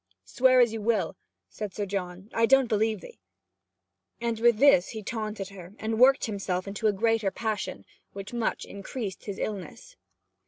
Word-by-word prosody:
'Swear 255 0 +4
as 240 -3 +4
you 225 - -4
will,' 210 -6 0 0.3
said 210 -3 -7
Sir 205 - -2
John, 185 -1 -5
'I 230 0 +3
don't 270 +1 +5
believe 220 -2 0
'ee.' 475 - -12 1.0
And 230 -1 -2
with 235 -1 +4
this 270 -9 +5
he 220 -2 -6
taunted 215 -3 -4
her, 190 0 -12
and 220 0 -2
worked 270 +2 +6
himself 195 -3 -3
into 205 +2 -1
a - - +4
greater 225 0 +1
passion, 210 - -4 0.3
which 195 +2 -8
much 235 -2 -1
increased 200 +1 -6
his 200 -2 -5
illness. 195 -6 -6
215 Hz, 165 wpm, -27 LUFS, 195-230 Hz, 1.0 s, worked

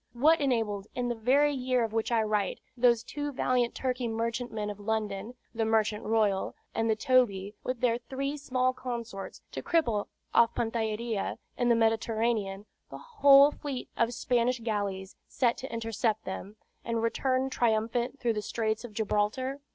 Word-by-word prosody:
What 305 +7 +4
enabled, 220 -7 0
in 245 -1 -1
the - - +1
very 270 +6 +3
year 255 -2 +1
of 220 -1 -3
which 225 +1 -1
I 230 -2 +3
write, 210 -3 0 0.2
those 235 -2 +4
two 290 +3 -4
valiant 250 -2 +1
Turkey 255 -2 -1
merchantmen 225 -1 -2
of 205 - -10
London, 215 +1 -3 0.2
the 225 -1 0
Merchant 220 -1 +1
Royal 210 -3 +1 0.2
and 225 0 0
the 220 - +3
Tobie, 215 -6 +2
with 255 -2 -3
their 235 -1 +2
three 275 +3 -3
small 255 -3 0
consorts, 235 -6 -6
to - - -5
cripple, 235 -12 +1 0.3
off 230 0 +4
Pantellaria 225 -1 -2 0.2
in 245 -1 +1
the 235 - +5
Mediterranean, 225 -3 0 0.2
the - - -8
whole 285 - +6
fleet 280 -4 -6
of 230 0 +1
Spanish 245 0 +1
galleys 200 -4 -3
sent 240 -3 +1
to 265 - -7
intercept 225 -1 -1
them, 190 +2 -6 0.3
and 230 -1 -1
return 260 +3 0
triumphant 235 +3 0
through 235 -2 +1
the 210 - -2
Straits 220 +1 -2
of 240 -3 -9
Gibraltar? 220 +6 -1
230 Hz, 160 wpm, -29 LUFS, 215-255 Hz, 0.3 s, whole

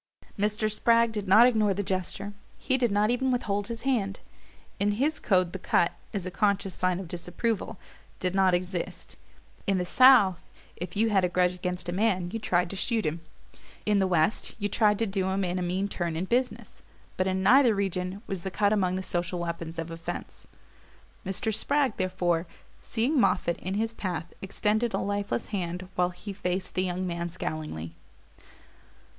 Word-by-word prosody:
Mr. 210 +1 0
Spragg 230 +1 +3
did 210 -2 -4
not 215 +5 +8
ignore 215 -5 +3
the 205 - -1
gesture: 195 +1 -3 0.2
he 260 - +1
did 245 -4 +1
not 210 +2 +3
even 260 +2 +1
withhold 205 -5 -1
his 230 -1 -6
hand. 220 -8 0 0.6
In 205 +1 +2
his 285 +9 0
code 185 -4 +2
the 190 - -4
cut, 170 -1 +2 0.2
as 195 -4 -3
a 185 - -4
conscious 200 -1 +1
sign 185 0 0
of 190 - -6
disapproval, 180 +6 -3 0.4
did 180 -1 -1
not 190 -2 +4
exist. 180 -1 -4 0.5
In 195 -1 +2
the 180 - -1
south, 235 -4 +6 0.3
if 180 +1 -6
you 220 +2 +2
had 195 -2 +3
a 180 - +2
grudge 180 0 +2
against 180 -1 -4
a - - -1
man 185 -2 +1
you 225 - -3
tried 180 -5 +1
to - - -5
shoot 225 +1 0
him; 160 +2 -2 0.6
in 210 -1 +3
the 190 - +2
west, 180 +4 +1
you 205 -2 -1
tried 210 0 +3
to 225 - +1
do 195 -2 -1
him 195 +1 0
in 180 0 -1
a - - -2
mean 185 +3 -1
turn 175 -4 -3
in 170 +3 -1
business; 245 +5 -2 0.3
but 185 - 0
in 190 0 0
neither 245 +2 +6
region 190 0 -2
was 190 -3 -4
the 190 - -3
cut 205 +2 +2
among 185 -3 +1
the 190 - -3
social 175 0 -2
weapons 170 -1 -4
of 165 0 -4
offense. 165 0 -7 0.8
Mr. 215 +4 -2
Spragg, 275 +2 +1
therefore, 175 -2 0 0.3
seeing 255 +6 0
Moffatt 185 -5 +2
in 185 +2 -3
his 225 +2 -1
path, 175 -6 -4
extended 215 +4 0
a - - +1
lifeless 205 +2 -2
hand 180 -3 -3
while 180 0 +2
he 190 +3 -8
faced 185 -1 -3
the 185 - +1
young 185 0 -2
man 170 -1 -3
scowlingly. 155 - -5
195 Hz, 185 wpm, -28 LUFS, 180-215 Hz, 0.8 s, not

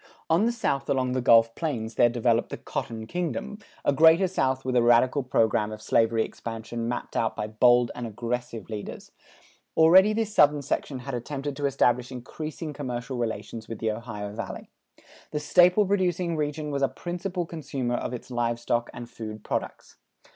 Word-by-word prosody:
On 180 +8 +4
the - - +2
south 140 -12 -2
along 130 -2 +1
the 130 0 0
Gulf 115 -2 +5
Plains 115 -9 -3
there 120 +2 +4
developed 120 -1 +1
the - - -5
"Cotton 110 -1 -5
Kingdom," 175 - -4 0.3
a - - +3
Greater 160 +5 +6
South 135 -7 -1
with 130 -1 -1
a 120 - +5
radical 120 +4 +4
program 110 -4 +1
of 110 - -7
slavery 115 +1 +2
expansion 115 0 -6
mapped 120 0 -4
out 115 - 0
by 105 - -3
bold 120 +2 +4
and 120 - -5
aggressive 120 +1 -4
leaders. 105 -2 -7 0.7
Already 185 +6 +7
this 220 -1 -1
Southern 145 -5 +4
section 135 +1 -2
had 135 +2 -7
attempted 140 +3 -4
to 145 0 0
establish 125 -2 +1
increasing 155 +5 -6
commercial 125 -2 -4
relations 115 -1 -4
with 115 - -6
the 110 0 -1
Ohio 105 -2 -6
Valley. 110 -2 -7 0.6
The 150 - -2
staple 180 +6 +5
producing 180 -3 0
region 150 0 -2
was 140 -1 -2
a 135 - +4
principal 175 0 -4
consumer 140 -7 -4
of 120 - -2
its 125 +1 -8
live 120 -1 -1
stock 120 0 -1
and 120 -1 -7
food 110 -2 -8
products. - - -5
125 Hz, 175 wpm, -26 LUFS, 115-155 Hz, 0.7 s, Already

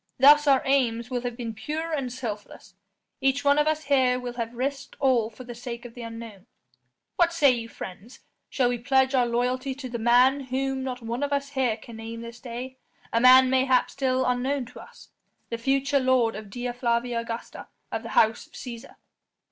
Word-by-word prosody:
Thus 295 +3 +7
our 270 -2 +5
aims 245 -3 +1
will 245 -1 -1
have 245 -1 -4
been 230 -3 -4
pure 310 +8 -4
and 270 -5 -2
selfless; 215 -6 -7 0.5
each 270 +1 +1
one 285 +1 +5
of 295 - +2
us 310 0 0
here 260 -3 +2
will 245 -1 -5
have 235 -1 -5
risked 275 +2 -3
all 255 -5 +2
for 235 +3 -12
the 245 -1 -8
sake 235 0 -7
of 235 - -10
an 245 - -8
unknown. 230 -3 -9 0.7
What 345 -1 +4
say 290 -5 +5
you 230 -2 -3
friends? 200 +4 -10 0.3
Shall 250 -3 +1
we 245 -1 -2
pledge 265 +2 +2
our 250 -2 +3
loyalty 250 +3 -1
to 270 -1 -7
the 235 -1 -4
man 250 +4 +4
whom 265 +1 -2
not 250 -2 -5
one 235 +3 -3
of 285 0 -1
us 280 0 -1
here 260 -5 0
can 225 0 -12
name 225 +1 -7
this 235 0 -9
day 255 +2 -7 0.4
a 230 - +3
man 255 +1 +7
mayhap 260 -1 +3
still 260 -1 0
unknown 255 +2 0
to - - -11
us: - - -14 0.4
the 230 - -3
future 275 +3 +1
lord 255 -3 +2
of 210 -1 -8
Dea 245 +4 -4
Flavia 240 -1 0
Augusta 230 0 -6 0.2
of 225 - -2
the 230 - -8
House 220 0 +3
of - - -31
Cæsar?" 235 -2 -9
250 Hz, 200 wpm, -26 LUFS, 235-270 Hz, 0.7 s, Thus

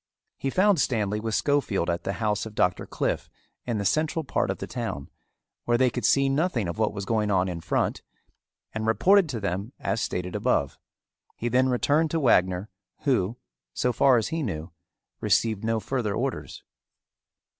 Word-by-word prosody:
He 135 - -1
found 190 +1 +3
Stanley 105 -4 0
with 110 0 -2
Schofield 140 - +1
at 85 0 -2
the 100 - -1
house 105 +2 -1
of 105 - -12
Doctor 90 0 +1
Cliffe - - -2 0.4
in 120 -3 0
the 100 - -2
central 155 - +1
part - - -1
of - - -1
the - - -5
town, 70 0 -5 0.5
where 120 0 +3
they 130 0 +3
could 125 - -3
see 140 0 +4
nothing 135 - 0
of 85 +6 -5
what 110 - +2
was 100 -1 -5
going 105 -1 0
on 95 -2 +2
in 85 -2 -4
front, 80 - -1 0.7
and 110 0 -3
reported 180 - +4
to 120 -5 -3
them 100 +4 -3
as - - -1
stated 90 0 -3
above. - - 0 0.6
He 120 - -2
then 130 +2 +3
returned 145 +6 +2
to 165 - 0
Wagner 95 - +3 0.3
who, 120 -6 +1 0.4
so 125 - +1
far 130 +2 +5
as 110 - 0
he 165 0 -2
knew, 85 - -4 0.5
received 110 -3 +1
no 115 0 +1
further 115 -3 -2
orders. - - -4
110 Hz, 175 wpm, -26 LUFS, 100-135 Hz, 0.7 s, far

